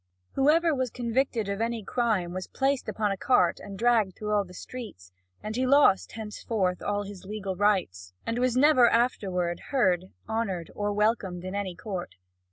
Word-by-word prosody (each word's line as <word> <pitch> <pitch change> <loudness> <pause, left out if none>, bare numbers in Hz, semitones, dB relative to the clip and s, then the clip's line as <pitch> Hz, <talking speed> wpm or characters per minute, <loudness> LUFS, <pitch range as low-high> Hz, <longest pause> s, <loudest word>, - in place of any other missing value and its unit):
Whoever 315 +4 +3
was 260 -2 -1
convicted 235 -2 -1
of 200 +2 -3
any 230 -1 -1
crime 210 -6 0
was 185 0 -5
placed 275 0 0
upon 210 -2 0
a 195 - -2
cart 180 -5 +2
and 195 -1 -9
dragged 225 -5 +2
through 210 0 -4
all 205 -1 +3
the 180 - -14
streets, 175 - -9 0.3
and 215 +1 -4
he 255 +1 +1
lost 275 -8 +4
henceforth 210 -3 -2
all 205 0 -1
his 200 -2 -9
legal 195 -1 -4
rights, 180 - 0
and 230 +1 -1
was 250 0 +1
never 255 -4 +6
afterward 185 -8 0
heard, 185 -10 +2 0.2
honoured, 200 -7 -2
or 205 0 -1
welcomed 205 -4 0
in 185 - -5
any 200 -3 -3
court. 190 -4 -6
210 Hz, 175 wpm, -27 LUFS, 185-240 Hz, 0.3 s, never